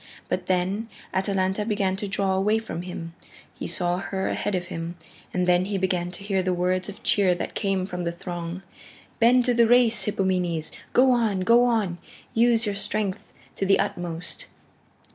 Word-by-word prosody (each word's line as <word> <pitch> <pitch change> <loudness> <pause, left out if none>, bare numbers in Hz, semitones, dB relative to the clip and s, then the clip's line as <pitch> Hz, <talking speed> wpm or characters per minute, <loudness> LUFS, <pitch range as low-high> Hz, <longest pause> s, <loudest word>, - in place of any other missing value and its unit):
But 180 0 -2
then 190 +5 0 0.2
Atalanta 190 +1 0
began 200 -3 0
to 205 - -4
draw 195 -1 +1
away 200 +3 +2
from 220 -6 -5
him. 170 -2 -7 0.4
He - - -6
saw 175 -1 +1
her 190 0 -2
ahead 205 - -1
of 180 -1 -2
him, 165 +1 -5 0.3
and 180 0 0
then 180 0 +3
he 200 0 -2
began 185 -2 0
to 180 +2 -7
hear 195 -2 0
the 185 0 0
words 180 +2 0
of 205 - -10
cheer 190 -3 +3
that - - -5
came 195 -2 0
from 180 -1 -4
the 170 - -1
throng 175 +1 -6 0.6
"Bend 240 +2 +5
to 250 - +3
the 235 -1 +4
race, 235 -4 +5
Hippomenes! 180 -5 0 0.2
Go 260 +1 +5
on, 220 -6 +1
go 235 +6 +5
on! 210 -8 0 0.3
Use 230 0 +4
your 205 - -1
strength 205 -1 -2 0.2
to - - -2
the 195 0 +4
utmost." 175 - -3
190 Hz, 180 wpm, -25 LUFS, 180-210 Hz, 0.6 s, Bend